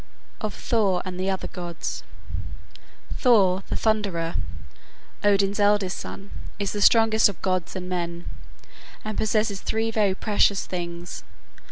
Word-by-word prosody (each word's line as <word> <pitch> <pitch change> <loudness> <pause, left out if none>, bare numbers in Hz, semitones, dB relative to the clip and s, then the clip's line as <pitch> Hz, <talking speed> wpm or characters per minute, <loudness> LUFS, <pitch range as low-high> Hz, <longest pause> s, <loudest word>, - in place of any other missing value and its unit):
] - - -32
OF 210 - -8
THOR 200 -6 +2
AND 185 -1 -5
THE 190 +1 0
OTHER 190 -1 -1
GODS 175 -2 -5 1.2
Thor, 195 -7 +4
the - - -1
thunderer, 200 -7 0 0.9
Odin's 200 0 +3
eldest 205 -2 +3
son, 195 +1 -8 0.3
is 200 -2 -1
the 205 - -3
strongest 220 -1 +6
of 195 - -7
gods 185 -2 0
and 180 -1 -4
men, 170 -1 -3 0.8
and 215 0 -3
possesses 215 -2 +1
three 225 +1 0
very 205 -4 +2
precious 205 -1 +2
things. 175 -1 -5
195 Hz, 135 wpm, -25 LUFS, 180-215 Hz, 1.2 s, strongest